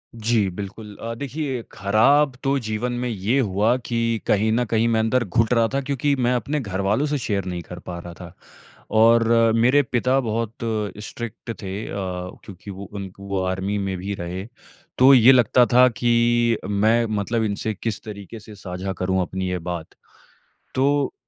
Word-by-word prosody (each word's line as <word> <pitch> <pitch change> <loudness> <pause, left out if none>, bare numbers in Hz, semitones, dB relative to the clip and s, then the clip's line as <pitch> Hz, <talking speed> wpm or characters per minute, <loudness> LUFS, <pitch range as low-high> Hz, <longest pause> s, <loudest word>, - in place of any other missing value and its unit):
जी, 110 -3 +1
बिल्कुल। 105 +2 -8
अ, 115 0 -4
देखिए, 140 0 -4
खराब 130 +9 +3
तो 140 0 +2
जीवन 110 +1 -3
में 125 - -1
ये 110 +4 0
हुआ 110 0 +2
कि 115 -1 0
कहीं 105 +2 +2
न 120 +3 +2
कहीं 115 0 +2
मैं 115 -1 +2
अंदर 115 +3 +2
घुट 115 +2 +1
रहा 115 -1 +3
था 140 - +1
क्योंकि 140 +1 0
मैं 125 -1 +1
अपने 145 +5 -1
घरवालों 100 +3 0
से 150 0 -1
शेयर 100 -7 -2
नहीं 90 -2 -4
कर 90 +2 -10
पा 90 -1 -7
रहा 85 0 -9
था 85 - -11 0.7
और 115 0 +5 0.3
मेरे 125 +5 +4
पिता 125 +1 +1
बहुत 115 -2 -2 0.5
स्ट्रिक्ट 115 0 -7
थे 95 -2 -5
अ, - - -7 0.5
क्योंकि 100 0 -10
वो 100 +1 -8
उन 100 -2 -5
क - - -22
वो 100 -1 -3
आर्मी 95 +2 -2
में 95 -1 -2
भी 95 +3 -4
रहे। 90 +2 -5 0.5
तो 130 +2 +7
ये 125 0 +8
लगता 125 -1 +5
था 125 +1 +7
कि 120 -1 +2
मैं 110 +3 +3
मतलब 115 +3 -1
इनसे 110 +1 -2
किस 105 +1 -4
तरीके 105 +1 -9
से 105 0 -13
साझा 95 0 -5
करूँ 95 +1 0
अपनी 95 +1 -3
ये 90 - -1
बात? 85 -1 -5 0.9
तो 140 +1 +1
110 Hz, 180 wpm, -22 LUFS, 100-120 Hz, 0.9 s, ये